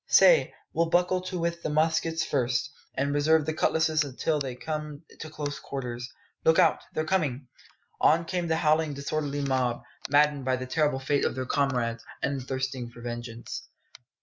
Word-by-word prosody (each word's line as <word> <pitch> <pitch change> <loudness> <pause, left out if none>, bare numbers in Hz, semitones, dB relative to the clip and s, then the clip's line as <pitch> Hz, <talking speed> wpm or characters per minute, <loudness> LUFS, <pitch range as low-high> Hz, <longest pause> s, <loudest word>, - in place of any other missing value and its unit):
Say, - - +6 0.2
we'll 165 0 +1
buckle 180 +2 +2
to 185 0 -4
with 170 0 -2
the - - -2
muskets 160 +1 +1
first, 130 0 0 0.2
and 140 +1 0
reserve 150 +1 +3
the 155 - -1
cutlasses 155 0 +2
till 155 -2 +1
it 125 -2 -6
comes 150 -1 -5 0.2
to 155 - -6
close 145 -2 -4
quarters. 125 -3 -5 0.3
Look 160 - +5
out; - - +5 0.2
they're 155 - 0
coming!" 150 -7 0 0.5
On 165 +2 +4
came 175 0 -2
the 160 - +2
howling, 155 -2 +2
disorderly 145 0 -2
mob, 130 -3 0 0.3
maddened 145 0 +4
by 130 0 +1
the 130 0 -4
terrible 150 +1 +1
fate 140 +1 +1
of - - 0
their 130 0 -3
comrades, 125 -5 0 0.2
and 140 -1 0
thirsting 130 -1 -3
for 120 - -14
vengeance. 120 -1 -6
145 Hz, 170 wpm, -28 LUFS, 130-160 Hz, 0.5 s, Say